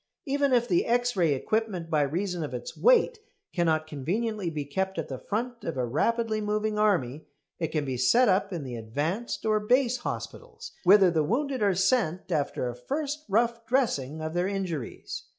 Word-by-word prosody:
Even 280 -1 +1
if 240 -1 +3
the 175 -6 +2
X 245 0 +1
ray 165 -6 +3
equipment, 190 +1 -2
by 155 -2 +3
reason 175 +4 -1
of 150 - -4
its - - -6
weight, 480 -1 +4 0.3
cannot 160 -3 +1
conveniently 185 - -2
be 150 -3 -4
kept 190 +6 -2
at 165 - -3
the 130 -2 -5
front 235 +3 -4
of 165 - -4
a 125 - 0
rapidly 220 - 0
moving 210 0 -1
army, 160 - +1 0.3
it 165 - 0
can 155 -2 -2
be 130 -2 -3
set 230 - +4
up 195 +1 +2
in 170 -5 -4
the 125 -3 -6
"advanced" 145 - -3
or 215 -1 +3
"base" 250 +3 +2
hospitals, 460 - -7
whither 190 -1 +7
the 160 -2 +2
wounded 260 - -1
are 200 -3 +3
sent 190 -3 +1
after 145 -5 -1
a 120 - -4
first 295 - -4
rough 230 +3 +1
dressing 160 - 0
of 155 0 -4
their 175 +1 +1
injuries. 185 -10 -4
195 Hz, 185 wpm, -27 LUFS, 155-235 Hz, 0.3 s, whither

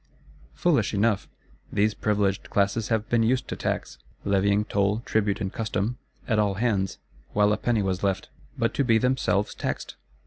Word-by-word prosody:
Foolish 140 - +2
enough! 105 0 +1 0.4
These 105 +1 +2
Privileged 100 -3 0
Classes 100 +2 +1
have 110 -1 0
been 120 -1 +2
used 125 +3 +1
to - - -2
tax; 65 - -3 0.3
levying 100 +1 +2
toll, 100 +1 +1
tribute 105 -3 0
and 95 -3 -3
custom, 110 +2 -2 0.3
at 110 -3 +2
all 100 -2 +2
hands, 100 -3 0 0.4
while 105 0 +4
a - - 0
penny 110 -2 +1
was 95 -1 -1
left: 95 -2 -1 0.3
but - - +1
to 140 - +1
be 115 -3 +4
themselves 125 -4 +1
taxed? - - -4
105 Hz, 165 wpm, -26 LUFS, 100-115 Hz, 0.4 s, while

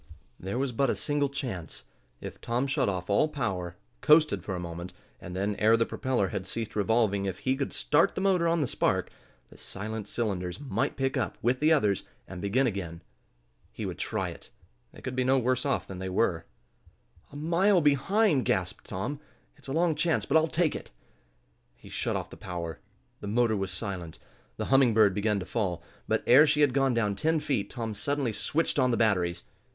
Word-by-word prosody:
There 95 +5 -4
was 135 0 0
but 130 +3 +1
a - - +1
single 145 -1 0
chance. 115 - -5 0.4
If - - -8
Tom 120 +3 0
shut 140 -4 +1
off 90 -2 -3
all 100 +9 +3
power, 95 - -3 0.3
coasted 155 0 +4
for 95 - -3
a - - -4
moment, 85 +1 -6 0.3
and 90 +1 -8
then, 100 +2 -1
ere 110 +2 +5
the 115 - +2
propeller 125 -8 -1
had 95 -1 -4
ceased 115 -2 -4
revolving, 105 -2 +2
if 95 -2 -3
he 130 +6 0
could 140 0 -3
start 150 +2 +2
the - - -2
motor 185 -3 +3
on 165 -1 +2
the 140 - +1
spark, - - 0 0.4
the - - -15
silent 110 +1 -5
cylinders 95 -6 -3
might 140 0 -2
pick 135 0 0
up, 130 - -2
with 125 +3 +2
the 155 +2 +3
others, 105 - +3 0.3
and 95 -2 -8
begin 115 +7 +2
again. 90 -7 -4 0.7
He - - -6
would - - -5
try - - -2
it. - - -11 0.4
They - - -14
could 130 - -5
be 130 - +1
no 130 +1 +3
worse 130 +2 +1
off 135 - 0
than 95 -1 -7
they 95 0 -4
were. 90 -4 0 0.8
"A - - -12
mile 175 +6 +3
behind!" 150 - +3
gasped - - -1
Tom. 120 +10 -4 0.4
"It's - - -16
a - - -4
long 165 +2 +2
chance, 155 +2 +1
but 140 - -1
I'll 160 0 +5
take 165 0 +1
it." - - -7 0.9
He - - -15
shut - - -2
off - - -4
the - - -10
power. 85 -2 -5 0.4
The 105 - -7
motor 115 +1 +2
was 95 -1 -2
silent, 95 -4 -5 0.4
the - - -2
Humming 130 -5 +5
Bird 105 -3 +5
began 105 +1 0
to - - -5
fall. 95 -6 -2 0.2
But - - +1
ere 145 +6 +7
she 150 0 +2
had 145 -4 +4
gone 135 -2 +2
down 105 -3 +1
ten 160 +7 +1
feet 135 -9 -1
Tom 115 -3 -4
suddenly 135 +2 -1
switched 155 +6 0
on 130 -1 +3
the 120 - +1
batteries. 90 -6 +1
120 Hz, 200 wpm, -28 LUFS, 100-145 Hz, 0.9 s, ere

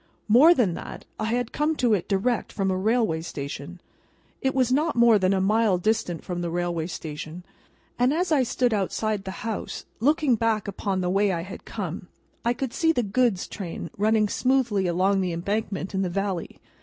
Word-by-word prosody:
More 275 +11 +7
than 210 - +2
that: - - -8
I - - -1
had 235 +1 -1
come 305 +1 0
to 245 -6 +2
it 190 -5 0
direct 210 +4 0
from 195 -2 -1
a - - 0
railway 215 -4 +1
station: 145 +2 -6 0.6
it 265 0 0
was 255 -2 +2
not 300 +4 +2
more 235 -3 +6
than 185 0 +2
a 195 - +2
mile 210 0 +3
distant 180 -3 -1
from 175 -1 -4
the 170 - -2
railway 170 -1 -2
station; 160 0 -7 0.6
and, 250 +2 +4
as 345 +3 0
I 295 -4 +4
stood 245 -1 +1
outside 210 0 -1
the 190 +3 -7
house, 225 -2 -4
looking 290 +2 +3
back 225 -2 0
upon 195 -1 -2
the 180 - 0
way 200 +1 +2
I 170 -2 -1
had 185 +2 -9
come, 185 -4 -5 0.4
I 235 - +2
could 260 -1 -4
see 325 -1 +3
the 245 -7 0
goods 215 -2 +1
train 170 -4 -6
running 215 +1 +2
smoothly 235 -5 +1
along 190 +3 +2
the 180 -2 -1
embankment 195 +2 -3
in 190 - 0
the 185 - 0
valley. 195 -1 -3
205 Hz, 195 wpm, -25 LUFS, 185-240 Hz, 0.6 s, More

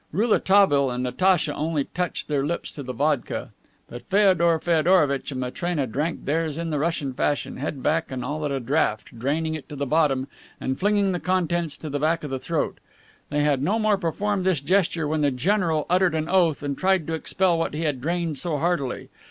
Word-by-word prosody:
Rouletabille 195 - +3
and 125 0 -3
Natacha 155 +4 +2
only 155 -1 -1
touched 180 +4 -4
their 145 -2 0
lips 170 +4 -3
to 145 - -8
the 130 -2 -5
vodka, 140 +1 -1 0.4
but 120 - -10
Feodor 185 -4 +4
Feodorovitch 160 -4 +2
and 130 - -4
Matrena 145 +4 -2
drank 150 +8 -3
theirs 155 0 -1
in 165 -1 -3
the 150 - 0
Russian 150 -4 -1
fashion, 145 +3 -1
head 140 0 -4
back 160 -1 0
and 125 -1 -4
all 150 +3 -3
at 150 - -1
a 135 - -1
draught, 115 -3 -1
draining 155 +6 -1
it 155 -3 -7
to 150 - -7
the 140 0 -2
bottom 140 -2 +2 0.3
and 130 0 -3
flinging 205 0 +2
the 180 - -2
contents 175 -4 -1
to 155 - -8
the 145 -1 -2
back 160 +2 +1
of 145 - -5
the 135 - -2
throat. 165 +3 -2 0.5
They 150 0 0
had 145 -3 +2
no 195 +10 +1
more 215 -1 +2
than 200 - -1
performed 195 +3 -1
this 185 -5 +2
gesture 170 0 +1
when 155 +1 0
the 145 - +3
general 165 +3 +1
uttered 180 -1 +2
an 155 0 -1
oath 170 -5 +2
and 140 -1 -2
tried 190 -1 +1
to 165 - -3
expel 175 +1 +1
what 165 - -2
he 155 - -3
had 145 -5 -1
drained 165 -1 -1
so 160 -1 -1
heartily. 150 -5 -1
155 Hz, 210 wpm, -24 LUFS, 140-175 Hz, 0.5 s, Feodor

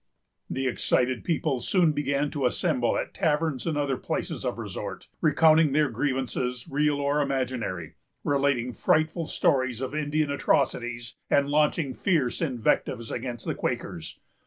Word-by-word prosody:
The 135 - -2
excited 125 0 +1
people 155 -5 0
soon 170 +4 +3
began 145 0 0
to 140 -4 +1
assemble 130 -5 +1
at - - -3
taverns 150 -3 0
and 155 -3 0
other 140 -3 0
places - - -3
of - - -2
resort, - - -6
recounting 155 -1 +5
their 150 -1 +3
grievances, 130 -3 -2
real 150 +1 +1
or 145 +1 +1
imaginary; 130 - -2 0.3
relating 140 -4 +1
frightful 160 +4 +1
stories 130 -8 +1
of 130 +1 -4
Indian 150 0 0
atrocities, 120 -4 0
and 140 0 +3
launching 150 -2 +2
fierce 155 -9 0
invectives 120 -4 0
against 120 -2 -4
the - - -1
Quakers. 80 -1 -4
140 Hz, 135 wpm, -27 LUFS, 125-150 Hz, 0.3 s, recounting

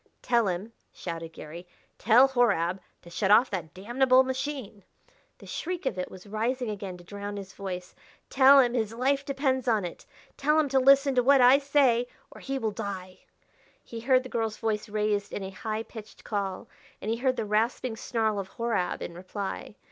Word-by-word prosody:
"Tell 235 -3 +2
him," 190 +5 -3 0.2
shouted 165 -2 -6
Garry, 170 +4 -10 0.2
" - - -40
tell 240 +5 +6
Horab 195 -8 +1 0.2
to 170 - -14
shut 190 +2 -1
off 230 +5 +6
that 170 -6 -5
damnable 255 +6 +3
machine!" 260 -6 -5 0.5
The - - -15
shriek 355 -1 -4
of 190 -8 -1
it 180 - -3
was 185 -1 -12
rising 230 +3 -2
again 195 -3 -6
to 175 - -15
drown 205 +2 -6
his 195 -1 -8
voice. 180 -2 -6 0.3
"Tell 275 +1 +7
him 245 -3 +3
his 225 -2 -1
life 275 +3 +1
depends 270 -2 -1
upon 215 -5 +2
it. 175 - -9 0.3
Tell 300 +2 +3
him 300 -2 +1
to 265 0 +3
listen 275 +1 +5
to 250 - +3
what 275 +2 +5
I 255 +2 +7
say 275 -4 +2 0.2
or - - -13
he 270 0 -3
will 225 -4 -1
die." 190 -2 -6 0.6
He 230 - -8
heard 255 +2 +3
the 255 - -9
girl's 225 -3 -2
voice 215 -1 -2
raised 210 -1 -1
in 200 - -4
a 190 - -6
high 220 +2 -4
pitched 220 -2 -12
call, 200 -3 -3 0.3
and 215 - -3
he 230 - 0
heard 255 +1 +1
the 220 - -2
rasping 225 +3 0
snarl 220 -2 -1
of 195 - -5
Horab 230 -6 -1
in - - -6
reply. 190 +3 -6
225 Hz, 195 wpm, -27 LUFS, 200-260 Hz, 0.6 s, Tell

